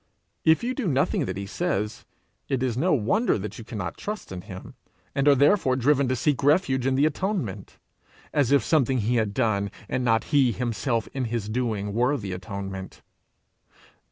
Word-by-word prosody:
If 160 +7 +4
you 250 +2 -1
do 255 -6 -2
nothing 140 -3 +1
that 95 - -4
he 100 - -4
says, 105 - -2 0.4
it 130 -2 0
is 125 -3 0
no 165 +9 +1
wonder 150 - +2
that 105 +2 -6
you - - -7
cannot 100 -6 -5
trust 210 - -6
in 90 -1 -5
him, 95 -1 -10 0.4
and 140 +1 +1
are 145 - +7
therefore 140 -1 +4
driven 140 +1 +2
to 130 - +1
seek 140 +2 0
refuge 140 -3 +2
in 135 - +2
the 140 +3 +4
atonement, 155 - -2 0.6
as 140 -4 +2
if 140 -5 +4
something 135 -3 +2
he 120 +2 +1
had 110 -3 +1
done, 105 -5 +1 0.2
and 125 - -1
not 115 -2 +2
he 135 -5 +4
himself 115 +2 -1
in 135 -2 -2
his 115 -2 -3
doing 110 -4 -2
were 125 +6 +2
the 100 -6 -5
atonement. 95 +1 -6
125 Hz, 185 wpm, -25 LUFS, 105-145 Hz, 0.6 s, are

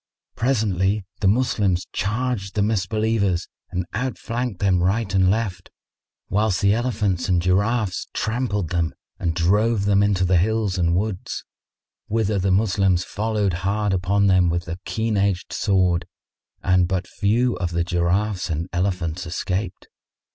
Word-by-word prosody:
Presently 105 -5 +1
the 100 - +1
Moslems 100 -5 +2
charged 105 -1 -2
the 105 - +2
Misbelievers 105 -3 0 0.2
and 90 0 -2
outflanked 120 -2 -3
them 95 -3 +2
right 95 +2 0
and 95 -1 +4
left, 95 -4 -2 0.6
whilst 105 -1 +1
the 100 0 +4
elephants 105 -7 -1
and 90 -1 +3
giraffes 100 +3 0
trampled 110 -7 -2
them 85 -2 0 0.2
and 85 -2 -1
drove 100 +5 +2
them 100 -1 +4
into 100 -2 +2
the 90 0 +3
hills 105 0 +1
and 85 -1 +2
wolds, 100 0 -3 0.6
whither 110 -2 0
the 95 +1 +1
Moslems 95 -2 +2
followed 105 -1 -1
hard 100 +1 0
upon 95 +2 +1
them 95 -3 +4
with 85 +1 -1
the 85 +1 -6
keen 110 -1 -1
edged 100 -2 0
sword 95 -4 +1 0.6
and 90 -1 +3
but 95 -1 -1
few 115 +6 +1
of 90 -1 -2
the 85 0 0
giraffes 90 +3 0
and 85 +2 -2
elephants 90 -1 -1
escaped. 90 +2 -3
95 Hz, 140 wpm, -22 LUFS, 90-110 Hz, 0.6 s, and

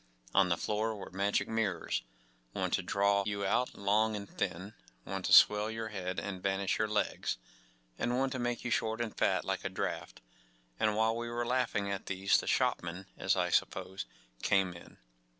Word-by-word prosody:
On 95 -2 +5
the 85 - +2
floor 110 +3 -1
were 100 - -8
magic 100 +2 +1
mirrors: 110 - -1 0.5
one - - -1
to - - +2
draw 100 0 +2
you 100 -1 -1
out 125 +6 +1
long 105 +2 +2
and 100 -1 -5
thin, 95 +6 -3 0.3
one 95 +6 -4
to 95 - -2
swell 105 +2 +7
your 110 0 -4
head 95 -3 -3
and 95 -2 -5
vanish 95 0 0
your 110 - +2
legs, 105 - -1 0.6
and 120 +1 0
one 135 0 +1
to 130 - -3
make 120 -1 -2
you 120 - -1
short 110 0 0
and 115 -3 -3
fat - - +1
like - - -2
a - - -1
draught; - - -4 0.6
and 110 -1 +2
while 110 +1 +2
we 120 0 -3
were 120 0 -2
laughing 120 -5 0
at 100 - -4
these 95 +1 +3
the - - -6
shopman, 85 +2 0
as - - +1
I - - +1
suppose, 95 -9 -1 0.3
came 95 -2 +2
in. 85 - -13
100 Hz, 185 wpm, -32 LUFS, 95-110 Hz, 0.6 s, swell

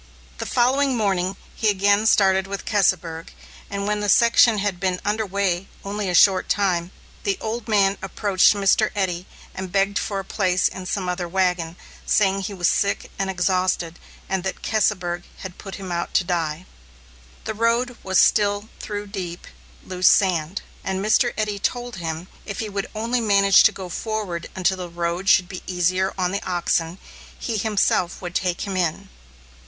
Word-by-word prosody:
The - - -4
following 260 +1 +2
morning, 190 -3 0 0.2
he 220 - +1
again 205 +2 +3
started 190 -2 +4
with 200 0 -5
Keseberg, 175 -5 0 0.4
and 200 0 -3
when 210 0 0
the 205 0 -1
section 230 0 +5
had 200 -3 -1
been 185 -1 -1
under 215 +1 0
way 195 -1 -1 0.2
only 200 -1 -3
a 180 - 0
short 190 0 +5
time, 180 -4 +1 0.3
the 395 -2 -1
old 225 +1 -4
man 200 -2 +2
approached 195 0 +3
Mr. 205 +2 +3
Eddy 185 -2 -2 0.3
and 190 -1 -6
begged 200 +1 +1
for 200 - -3
a 195 - -6
place 185 -3 +1
in 185 -1 -7
some 190 -2 -2
other 180 0 -2
wagon, 180 -2 0 0.3
saying 195 -2 +2
he 195 +1 -4
was 175 -2 +1
sick 200 - 0
and 195 0 -1
exhausted, 180 -2 0 0.3
and 190 -2 -1
that 190 - -4
Keseberg 185 -5 0 0.2
had 185 -2 -8
put 195 - -8
him 190 -2 -7
out 170 0 -3
to - - +4
die. 170 -1 -2 0.8
The - - -3
road 235 +3 +1
was 190 -1 +2
still 205 0 +3
through 205 -1 -5
deep, 185 -4 -6 0.4
loose 185 0 +3
sand, 180 -2 +1 0.2
and 190 +1 -2
Mr. 240 +3 +3
Eddy 210 -2 -1
told 245 +1 -2
him 165 0 -5 0.2
if 200 - -5
he 220 - -3
would 200 -1 -4
only 235 +3 0
manage 200 -3 +5
to - - +6
go 190 -2 -7
forward 195 -3 -4
until 190 0 +1
the 180 -1 -6
road 170 +2 -2
should 185 - +5
be 185 -1 -7
easier 185 +1 +1
on 180 -1 0
the 200 +2 -2
oxen, 175 -1 -1 0.4
he 230 -2 -3
himself 200 -4 +1
would 175 -1 -6
take 180 -1 -1
him 195 -2 -3
in. 185 +2 -1
195 Hz, 175 wpm, -22 LUFS, 180-205 Hz, 0.8 s, to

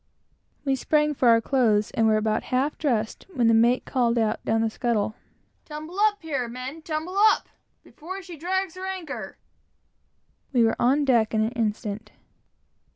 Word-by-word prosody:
We 270 -1 +2
sprang 300 +3 +1
up 290 - -7
for 250 - +2
our 230 -1 +6
clothes, 220 -5 +2
and 225 -1 +2
were 215 -1 +4
about 215 0 0
halfway 265 +4 -1
dressed, 230 -7 -1
when 245 -3 +2
the 230 - +5
mate 235 +3 +3
called 240 -3 +1
out, 220 -2 0
down 225 0 +1
the 225 - +1
scuttle, 220 -3 -1 0.5
"Tumble 310 +5 -8
up 415 -2 +2
here, 275 -6 -2
men! 255 +6 -7
tumble 315 +4 -4
up! 430 +1 +4 0.3
before 375 +5 -9
she 345 -1 -9
drags 370 +2 -2
her 370 +1 -6
anchor." 365 -6 -6 1.2
We 240 -2 +4
were 225 - +2
on 275 +4 +3
deck 230 -4 +2
in 215 - +2
an 220 +1 0
instant. 215 -2 -3
255 Hz, 170 wpm, -25 LUFS, 225-310 Hz, 1.2 s, our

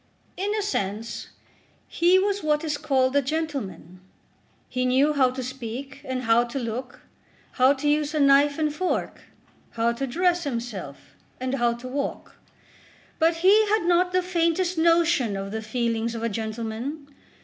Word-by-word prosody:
In 410 +3 -1
a 425 - -1
sense 220 - -3 0.6
he 350 +2 +3
was 400 +1 +1
what 300 0 +1
is 305 -2 -1
called 260 -1 +1
a 285 - +5
gentleman. 275 - -4 0.7
He 255 0 -2
knew 265 +4 +3
how 265 -3 +4
to 255 +1 -5
speak, 260 +2 -7
and 260 -2 -3
how 230 +1 +4
to 240 +2 -6
look, 245 +1 -5 0.5
how 260 +1 +4
to 285 +1 -3
use 300 +1 +1
a - - +1
knife 280 +1 +5
and 305 -2 0
fork, 365 +4 -2 0.5
how 230 +1 +1
to 270 +3 -3
dress 350 +6 +1
himself, 230 - -6 0.2
and 255 +1 -2
how 240 -3 +1
to 240 +2 -9
walk. 275 +2 -4 0.8
But 325 0 +3
he 425 +3 +6
had 430 -1 +2
not 355 +1 +3
the 365 0 +1
faintest 350 0 0
notion 330 - +2
of 195 0 -5
the 220 +1 -3
feelings 230 0 -2
of 230 - -5
a 230 - 0
gentleman. 225 +7 -4
275 Hz, 160 wpm, -25 LUFS, 235-325 Hz, 0.8 s, he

